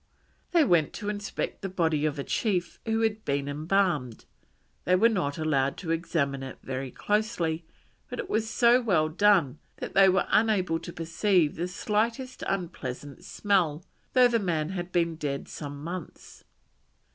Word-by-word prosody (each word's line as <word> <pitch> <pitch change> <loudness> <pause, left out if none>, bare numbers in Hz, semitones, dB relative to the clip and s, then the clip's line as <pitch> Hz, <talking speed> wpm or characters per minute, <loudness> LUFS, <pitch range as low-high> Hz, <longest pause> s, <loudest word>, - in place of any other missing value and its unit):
They 340 -3 +5
went 170 - +3
to 205 -2 -4
inspect 205 -1 -4
the 195 - -3
body 160 -4 +1
of 150 0 -3
a 140 - -3
chief 185 - -1
who 225 0 +1
had 220 -1 0
been 140 0 -1
embalmed; 155 - 0 0.6
they 180 - +3
were 215 +5 +5
not 170 -10 -1
allowed 140 -4 +1
to 165 -4 -4
examine 155 -5 -1
it 135 -1 -7
very 130 0 -4
closely, 175 - -1 0.4
but 250 - -5
it - - -4
was 220 +1 -1
so 240 +2 +4
well 175 -10 +2
done 170 -6 +3 0.2
that - - -6
they 195 0 +7
were 190 +1 +2
unable 195 -7 +2
to 175 - -8
perceive 165 0 +1
the 175 +2 -2
slightest 230 +7 -2
unpleasant 145 -7 -4
smell, 180 -6 0 0.3
though 250 -1 +7
the 235 -1 +1
man 165 -6 -1
had 180 -1 -5
been 170 -2 +1
dead 140 -3 -3
some 145 -1 -7
months. 175 +1 -8
175 Hz, 160 wpm, -27 LUFS, 150-210 Hz, 0.6 s, they